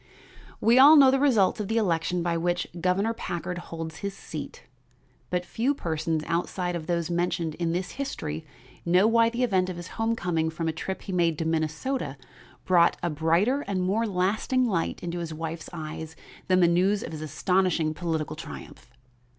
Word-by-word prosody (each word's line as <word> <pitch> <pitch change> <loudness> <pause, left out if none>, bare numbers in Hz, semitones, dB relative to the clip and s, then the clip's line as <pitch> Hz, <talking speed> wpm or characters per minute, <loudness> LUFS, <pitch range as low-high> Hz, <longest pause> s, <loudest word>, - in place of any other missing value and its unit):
We 235 +3 +5
all 290 +4 +9
know 275 -3 +8
the 270 - +2
results 230 -9 +3
of 210 - -2
the 225 - 0
election 175 -4 0
by 170 -1 0
which 175 +1 0 0.2
Governor 195 +5 +1
Packard 175 -4 -4
holds 165 -2 -7
his 200 0 -5
seat, - - -8 0.7
but 180 0 -1
few 255 +9 0
persons 160 - -2
outside 180 +1 -2
of 160 -2 -5
those 170 0 -1
mentioned 170 -2 -1
in 170 +1 -2
this 180 +2 -2
history 160 - -4 0.4
know 180 +3 +4
why 230 +1 +4
the 240 +2 -2
event 190 -6 +2
of 185 - -4
his 175 0 -8
homecoming 180 -8 0
from 165 +1 -3
a - - +1
trip 190 +4 -5
he 195 - -6
made 170 -3 +1
to 160 - -2
Minnesota 160 - -2 0.5
brought 175 -2 +4
a 175 - 0
brighter 170 - +2
and 190 -2 -1
more 215 +5 +1
lasting 210 +7 +1
light 175 -7 -1
into 175 0 -3
his 165 -2 -5
wife's 160 0 -5
eyes 160 +1 -7 0.3
than 185 0 +4
the 175 - +6
news 185 +4 +2
of - - -6
his 155 -1 -6
astonishing 165 +1 +1
political 160 -2 -3
triumph. 155 - -10
175 Hz, 180 wpm, -26 LUFS, 165-200 Hz, 0.7 s, all